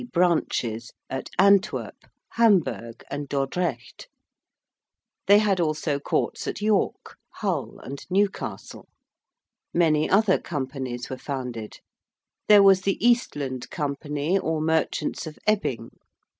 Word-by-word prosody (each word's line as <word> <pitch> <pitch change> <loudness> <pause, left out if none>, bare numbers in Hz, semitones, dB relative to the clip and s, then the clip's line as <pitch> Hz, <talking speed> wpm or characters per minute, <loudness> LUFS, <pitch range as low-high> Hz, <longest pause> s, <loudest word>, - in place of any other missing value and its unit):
branches 130 -10 0 0.2
at 130 - -4
Antwerp, 200 +1 +3 0.4
Hamburg, 185 - +1
and 145 0 -4
Dordrecht: 145 - -3 1.2
they 205 - +8
had 205 -3 +2
also 155 -3 0
courts - - -2
at - - -3
York, 210 -1 0 0.2
Hull, - - -3
and 140 +1 -7
Newcastle. 195 +1 -2 0.9
Many 155 -3 +3
other 200 -1 +4
companies 130 -5 -5
were 130 - -4
founded. 125 -6 -6 0.7
There 210 -1 +8
was 195 -1 +6
the 195 0 0
Eastland 145 - 0
Company 150 +3 -1
or 160 -3 -1
merchants 160 0 -1
of 155 - -9
Ebbing. 165 - 0
155 Hz, 105 wpm, -25 LUFS, 135-195 Hz, 1.2 s, they